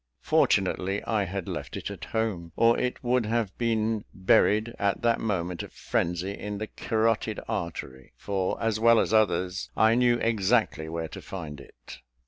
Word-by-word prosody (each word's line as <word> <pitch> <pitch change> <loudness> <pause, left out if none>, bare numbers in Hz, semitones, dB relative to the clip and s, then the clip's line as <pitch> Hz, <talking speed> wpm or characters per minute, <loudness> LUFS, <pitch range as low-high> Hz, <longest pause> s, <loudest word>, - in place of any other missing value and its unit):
Fortunately 95 +1 +2
I 105 -3 0
had 95 -1 -5
left - - -5
it - - -5
at - - -7
home, 100 -7 -2
or 115 0 +5
it 125 0 -2
would 125 -2 +1
have 115 -3 -1
been 110 -2 0
buried, 105 +4 +3
in - - -12 0.2
that 115 -1 +1
moment 90 -5 -2
of - - -9
frenzy, 90 +3 -1
in 105 0 -5
the 110 - -3
carotid 110 0 0
artery; 80 - -5
for 95 -2 -2
as 115 -2 0
well 115 0 +6
as - - 0
others, 95 -3 +1
I 110 +1 +5
knew 120 0 +4
exactly 110 -7 +1
where 80 0 -3
to - - -9
find 75 -7 -7
it. - - -13
105 Hz, 165 wpm, -27 LUFS, 90-115 Hz, 0.2 s, well